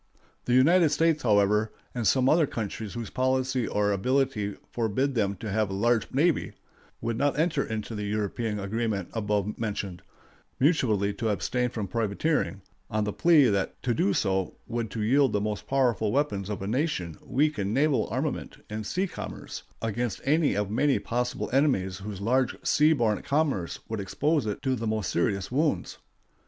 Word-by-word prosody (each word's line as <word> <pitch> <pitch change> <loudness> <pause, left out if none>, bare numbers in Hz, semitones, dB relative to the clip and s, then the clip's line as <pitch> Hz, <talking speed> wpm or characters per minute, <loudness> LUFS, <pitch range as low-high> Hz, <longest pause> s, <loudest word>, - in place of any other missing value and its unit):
The 120 - +1
United 165 +6 +5
States, 160 0 +2
however, 105 -1 +3 0.2
and 120 -4 -1
some 130 -1 +3
other 155 +1 +4
countries 110 -2 -5
whose 115 -3 -5
policy 130 -1 0
or 105 0 +1
ability 120 -1 0 0.2
forbid 120 +4 0
them 100 -4 0
to 105 +2 -6
have 110 0 +1
a - - -4
large 115 +2 +1
navy, 155 +5 +1 0.5
would 115 0 -2
not 145 0 +1
enter 160 +2 +1
into 110 +1 -4
the 105 -1 -3
European 105 +1 -2
agreement 100 -1 -2
above 105 -2 -1
mentioned, 100 -5 -3 0.6
mutually 115 - +2
to 110 +2 -2
abstain 125 +4 0
from 110 -4 -4
privateering, 110 - -1 0.3
on 110 0 0
the 105 -1 -2
plea 165 -4 +5
that 100 -2 -1
to 125 - +1
do 100 -3 +2
so 95 -2 0
would 115 -1 -3
be - - -12
to 110 - -3
yield 135 +2 +3
the 105 - +2
most 105 0 -3
powerful 120 -6 +1
weapon 130 -8 0
of 100 -2 -4
a - - -3
nation 110 - -1
weak 150 +1 +1
in 100 0 -1
naval 140 +3 +2
armament - - -3
and 105 -1 -4
sea 185 +2 0
commerce, 190 - -7 0.2
against 115 0 -2
any 150 -1 +3
of 105 0 -1
many 140 +5 +2
possible 125 +1 -2
enemies 95 -10 +2
whose 100 -1 -6
large 125 +4 +1
sea 150 +1 +4
borne 115 -8 +1
commerce 140 - 0
would 110 -1 -3
expose 145 - 0
it 105 - -4
to 130 -2 +1
the 115 -2 -3
most 110 -1 -1
serious 95 +2 0
wounds. 150 +4 0
115 Hz, 175 wpm, -27 LUFS, 105-135 Hz, 0.6 s, United